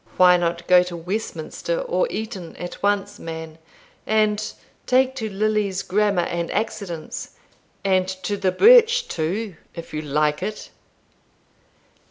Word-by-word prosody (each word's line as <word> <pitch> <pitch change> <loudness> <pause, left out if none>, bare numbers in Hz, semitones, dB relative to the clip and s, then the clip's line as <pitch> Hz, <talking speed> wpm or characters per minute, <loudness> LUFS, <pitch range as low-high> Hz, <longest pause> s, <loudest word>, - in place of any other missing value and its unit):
Why 180 -1 +7
not 170 -1 -1
go 180 0 +6
to 180 -1 -5
Westminster 190 - -3
or - - 0
Eton 215 - -6
at 175 0 -7
once, 205 0 0
man, 160 -1 -7 0.5
and 215 -1 +1 0.4
take 260 +1 +3
to 220 -3 -3
Lilly's 205 -1 0
Grammar 200 -2 +1
and 170 0 -3
Accidence, 195 -6 -4 0.5
and 185 -1 +2
to 190 +2 -3
the 195 -2 0
birch, 475 - +6
too, 180 +4 -3 0.2
if 165 -1 -9
you 155 - -2
like 150 +1 0
it?" 210 +3 -5
190 Hz, 130 wpm, -22 LUFS, 170-215 Hz, 0.5 s, Why